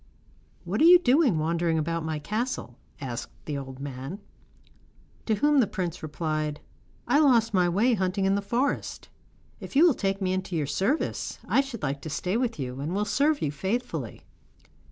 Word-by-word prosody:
'What - - -2
are - - +7
you 355 +1 +10
doing 270 - +3
wandering 165 +1 0
about 165 +1 -1
my 160 -1 -2
castle?' 210 - -3 0.2
asked 125 -4 -5
the 150 - -3
old 135 -1 -7
man. 135 +5 -6 1.1
To 220 - +3
whom 295 +6 +3
the 235 - +4
prince 180 -4 -4
replied: 155 -1 -3 0.5
'I 270 +5 +4
lost 235 -7 +4
my 180 -2 +3
way 215 +8 +3
hunting 190 -1 0
in 195 - +3
the 200 - +1
forest. 240 +7 -2 0.5
If - - -9
you 305 +5 +7
will 340 - +6
take 195 -3 -1
me 185 -2 0
into 185 -1 -3
your 155 -3 0
service, 195 - -1
I - - +4
should 270 -5 -8
like 140 +1 -2
to 160 - -6
stay 180 +5 -2
with 240 -3 0
you, 130 -2 -5
and 155 +6 -3
will 205 +1 0
serve 285 +9 +1
you 145 - 0
faithfully. 210 - -3
190 Hz, 180 wpm, -27 LUFS, 155-240 Hz, 1.1 s, you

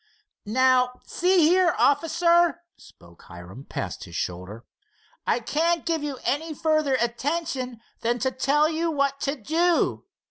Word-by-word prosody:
"Now, 250 +2 +2
see 360 -2 +3
here, 355 -1 +3
officer," 340 +3 +2
spoke 85 0 -19
Hiram, 90 +9 -11
past - - -5
his - - -11
shoulder, 90 +6 -5 0.6
"I - - +2
can't 325 +8 0
give 330 -2 0
you 290 -2 -4
any 305 +5 -2
further 310 -3 +1
attention 255 0 -2 0.2
than 240 +1 0
to 260 +1 -1
tell 285 +4 +2
you 325 +1 -1
what 280 -2 0
to 275 +1 -1
do. 325 +7 0
285 Hz, 135 wpm, -25 LUFS, 245-330 Hz, 0.6 s, see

